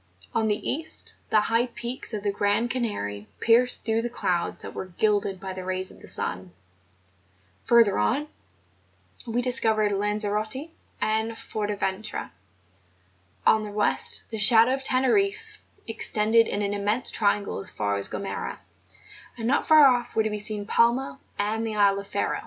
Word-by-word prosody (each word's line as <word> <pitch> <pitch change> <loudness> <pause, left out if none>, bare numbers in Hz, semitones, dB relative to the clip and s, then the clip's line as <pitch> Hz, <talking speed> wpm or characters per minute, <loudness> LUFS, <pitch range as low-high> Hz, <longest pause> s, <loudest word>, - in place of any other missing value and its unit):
On 220 -1 +1
the 210 -1 -1
east, 315 +4 -1 0.2
the 215 - +4
high 230 +3 +1
peaks 240 +1 -5
of 210 -3 -4
the 205 - 0
grand 205 +4 0
Canary 105 - -3
pierced 240 +2 +2
through 225 0 +1
the 240 - -3
clouds 175 -7 -2
that - - -8
were 190 - -6
gilded 200 +1 0
by 190 0 -6
the 185 0 -7
rays 185 0 -3
of - - -17
the - - -12
sun; 90 -1 -4 1.1
further 230 -4 +4
on, 285 +6 0 1.0
we 235 +2 -1
discovered 220 -4 +3
Lanzerote 210 +7 -1 0.3
and 220 +1 0
Forteventura; 205 -1 -4 1.1
on 220 - +5
the 210 - -6
west, 210 0 +1
the 220 - -4
shadow 225 +3 +6
of 270 - -2
Teneriffe 265 +11 +1 0.3
extended 225 0 +2
in 205 - -1
an 200 0 -1
immense 205 +4 0
triangle 205 - 0
as 95 - -3
far 100 -1 -2
as 100 - +1
Gomera; 200 - -5 0.8
and 225 -1 -3
not 265 - +1
far 310 -2 +8
off 245 -2 +2
were 220 - +3
to 215 - -2
be 210 - -3
seen 210 0 -1
Palma 240 +5 +1 0.2
and 210 +2 -1
the 220 -1 -3
isle 200 -1 +3
of 200 - -9
Ferro. 200 - -2
215 Hz, 160 wpm, -25 LUFS, 205-235 Hz, 1.1 s, far